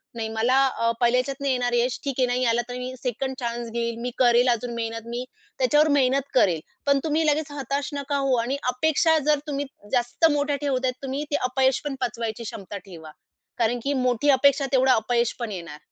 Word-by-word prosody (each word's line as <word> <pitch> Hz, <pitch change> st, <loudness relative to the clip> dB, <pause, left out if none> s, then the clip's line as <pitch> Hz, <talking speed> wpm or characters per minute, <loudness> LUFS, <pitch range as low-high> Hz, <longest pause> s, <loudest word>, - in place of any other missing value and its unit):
नाही 225 Hz, -1 st, -3 dB
मला 240 Hz, +4 st, +2 dB
अ, 230 Hz, -3 st, 0 dB
पहिल्या 240 Hz, +1 st, +4 dB
ह्याच्यात 275 Hz, +1 st, -4 dB
नाही 280 Hz, -1 st, +1 dB
येणार 245 Hz, -1 st, -1 dB
यश. 240 Hz, +1 st, +1 dB
ठीक 275 Hz, -2 st, -3 dB
आहे. 255 Hz, -, +3 dB
नाही 250 Hz, +1 st, 0 dB
आला 235 Hz, +1 st, +1 dB
तर 245 Hz, -, -5 dB
मी 250 Hz, +1 st, -5 dB
2nd 260 Hz, +2 st, -2 dB
चान्स 235 Hz, -1 st, -3 dB
घेईल. 235 Hz, 0 st, -2 dB
मी 245 Hz, +1 st, -3 dB
करेल 245 Hz, 0 st, +4 dB
अजून 240 Hz, 0 st, -1 dB
मेहनत, 230 Hz, 0 st, -4 dB
मी 240 Hz, +2 st, -4 dB, 0.3 s
त्याच्यावर 295 Hz, +4 st, +4 dB
मेहनत 275 Hz, +1 st, +1 dB
करेल. 180 Hz, -10 st, +3 dB, 0.3 s
पण 280 Hz, -1 st, +3 dB
तुम्ही 315 Hz, 0 st, +1 dB
लगेच 300 Hz, 0 st, +1 dB
हताश 280 Hz, 0 st, -3 dB
नका 285 Hz, 0 st, -2 dB
होऊ 275 Hz, -2 st, +2 dB
आणि 265 Hz, +4 st, -2 dB
अपेक्षा 315 Hz, +4 st, +2 dB
जर 300 Hz, -1 st, +4 dB
तुम्ही 285 Hz, -1 st, -2 dB, 0.3 s
जास्त 245 Hz, +5 st, +1 dB
मोठ्या 290 Hz, 0 st, 0 dB
ठेवतायेत, 260 Hz, -3 st, 0 dB
तुम्ही 270 Hz, +2 st, -3 dB
ते -, -, +2 dB, 0.2 s
अपयश 265 Hz, 0 st, +2 dB
पण 285 Hz, -2 st, -2 dB
पचवायची 235 Hz, -2 st, -3 dB
क्षमता 200 Hz, -1 st, -7 dB
ठेवा. 165 Hz, -5 st, -11 dB, 0.5 s
कारण 240 Hz, +1 st, +1 dB
की 285 Hz, +1 st, 0 dB
मोठी 250 Hz, +4 st, +1 dB
अपेक्षा 280 Hz, +1 st, +4 dB
तेवढं 260 Hz, -1 st, +4 dB
अपयश 235 Hz, +1 st, +1 dB
पण 235 Hz, -3 st, -3 dB
येणार. 170 Hz, -6 st, -7 dB
255 Hz, 200 wpm, -24 LUFS, 235-280 Hz, 0.5 s, पहिल्या